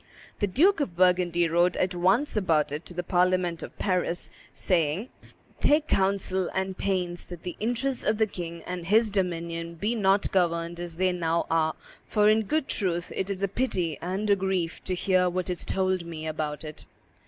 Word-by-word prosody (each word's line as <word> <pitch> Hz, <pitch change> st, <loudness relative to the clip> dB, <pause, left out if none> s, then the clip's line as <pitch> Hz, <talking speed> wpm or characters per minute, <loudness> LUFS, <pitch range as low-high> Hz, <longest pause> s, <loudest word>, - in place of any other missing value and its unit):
The 205 Hz, -, +1 dB
Duke 330 Hz, -, +4 dB
of 185 Hz, -, -2 dB
Burgundy 180 Hz, -2 st, +3 dB
wrote 175 Hz, +2 st, +2 dB
at 185 Hz, 0 st, +1 dB
once 190 Hz, +12 st, +2 dB
about 160 Hz, -8 st, +2 dB
it 150 Hz, +3 st, -5 dB
to -, -, -9 dB
the 180 Hz, -, -2 dB
parliament 180 Hz, -1 st, +1 dB
of -, -, -9 dB
Paris, 180 Hz, -3 st, -1 dB, 0.2 s
saying, 175 Hz, -, 0 dB, 0.5 s
"Take 300 Hz, +1 st, +3 dB
counsel 190 Hz, -1 st, +1 dB
and 190 Hz, 0 st, -1 dB
pains 180 Hz, -3 st, -2 dB
that 175 Hz, -2 st, -10 dB
the 180 Hz, -, -5 dB
interests 245 Hz, +4 st, -1 dB
of 215 Hz, -, +1 dB
the 220 Hz, -, +3 dB
king 170 Hz, -4 st, -7 dB
and 180 Hz, -2 st, -5 dB
his 215 Hz, +2 st, +4 dB
dominion 170 Hz, -3 st, -2 dB
be 205 Hz, +8 st, -1 dB
not 200 Hz, -3 st, +2 dB
governed 170 Hz, -2 st, 0 dB
as 175 Hz, -1 st, -5 dB
they 185 Hz, 0 st, +2 dB
now 170 Hz, -1 st, 0 dB
are, 160 Hz, -1 st, +2 dB, 0.3 s
for, 210 Hz, -1 st, +4 dB
in 215 Hz, 0 st, +3 dB
good 310 Hz, +4 st, 0 dB
truth, 175 Hz, -4 st, -1 dB
it 190 Hz, -, -2 dB
is 195 Hz, 0 st, -3 dB
a -, -, +3 dB
pity 185 Hz, -, -1 dB
and 190 Hz, +5 st, -2 dB
a -, -, +6 dB
grief 190 Hz, -3 st, -2 dB
to 185 Hz, -, -1 dB
hear 185 Hz, 0 st, +2 dB
what 180 Hz, +1 st, -2 dB
is 180 Hz, -, -3 dB
told 185 Hz, -2 st, 0 dB
me 165 Hz, -2 st, -7 dB
about 155 Hz, -1 st, -3 dB
it." 155 Hz, -1 st, -8 dB
180 Hz, 190 wpm, -27 LUFS, 170-195 Hz, 0.5 s, a